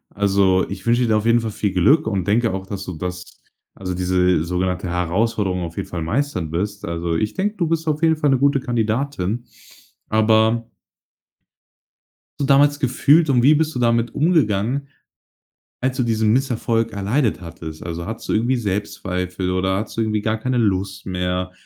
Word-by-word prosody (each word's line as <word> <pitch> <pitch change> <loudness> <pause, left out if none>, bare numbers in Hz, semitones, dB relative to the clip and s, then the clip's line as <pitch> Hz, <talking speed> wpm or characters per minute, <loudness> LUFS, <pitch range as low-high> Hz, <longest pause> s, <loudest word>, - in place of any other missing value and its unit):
Also 95 -2 +2
ich 100 - -7
wünsche 120 +1 +3
dir 110 - +2
auf 105 - -2
jeden 115 +1 +4
Fall 115 -1 -4
viel 105 -1 -1
Glück 140 - +3
und 100 -5 -1
denke 115 +3 +2
auch, 95 0 -4
dass 95 0 -6
du 90 - -5
das, 90 +1 -5 0.5
also 90 -1 -5
diese 90 -2 +1
sogenannte 90 +1 -2
Herausforderung 90 +2 0
auf 85 -1 -6
jeden - - -3
Fall 85 - -5
meistern 90 - -2
wirst. 100 +4 -3
Also 85 0 -2
ich 105 +6 -1
denke, 205 +2 -1
du 175 -5 -1
bist 160 0 -1
auf 155 0 0
jeden 160 -1 +3
Fall 150 -2 +2
'ne 135 - +2
gute 140 +1 +3
Kandidatin. 120 -2 -2 0.6
Aber 110 +1 +2 1.7
so - - +2
damals 145 +1 +4
gefühlt 145 +5 +3
und 125 -3 +3
wie 145 +4 +7
bist 155 0 0
du - - -2
damit 115 -1 +1
umgegangen, 140 - +1 0.9
als 130 +1 -1
du 125 - +1
diesen 110 -2 +1
Misserfolg 115 -2 0
erleidet 105 +3 0
hattest? 80 -2 -9
Also 85 0 -5
hattest 115 +2 -7
du - - +1
irgendwie 120 +4 +2
Selbstzweifel 95 -4 -3
oder 95 +1 0
hattest 110 +2 -5
du - - +1
irgendwie 110 -1 0
gar 110 +1 0
keine 125 +3 -1
Lust 95 -3 -1
mehr 90 0 -2
110 Hz, 175 wpm, -21 LUFS, 90-125 Hz, 1.7 s, wie